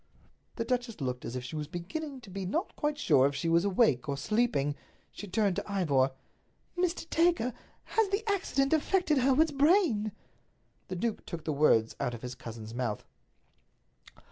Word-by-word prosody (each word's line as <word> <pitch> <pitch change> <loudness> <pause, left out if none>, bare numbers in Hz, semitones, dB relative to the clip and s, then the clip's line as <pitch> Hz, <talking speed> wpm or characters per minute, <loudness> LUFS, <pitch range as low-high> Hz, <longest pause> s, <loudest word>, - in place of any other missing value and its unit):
The 230 - -2
duchess 245 -2 -2
looked 125 -3 -3
as 115 - -5
if 125 - -3
she 125 +5 -7
was 150 -1 -3
beginning 265 - -5
to 210 -6 -13
be 195 +1 -4
not 315 - -2
quite 295 0 -1
sure 140 - +4
if 140 - -3
she 140 +4 -2
was 165 +1 +4
awake 185 - +2
or 140 - -1
sleeping. 150 - +1 0.4
She 205 - -8
turned 200 -1 +1
to - - -4
Ivor. 145 -9 +2 0.7
"Mr. 355 -2 -1
Dacre, 330 -9 +2 0.3
has 445 -3 +1
the 410 +3 -1
accident 320 -9 +1
affected 320 -1 +2
Hereward's 275 +5 +4
brain?" 280 - +3 0.8
The 185 - -4
duke 220 +4 -2
took 165 -3 -6
the 155 - 0
words 125 -6 +3
out 125 -4 -1
of 115 - -11
his 125 0 -5
cousin's 115 -2 -8
mouth. 120 -4 -3
200 Hz, 170 wpm, -30 LUFS, -, 0.8 s, sure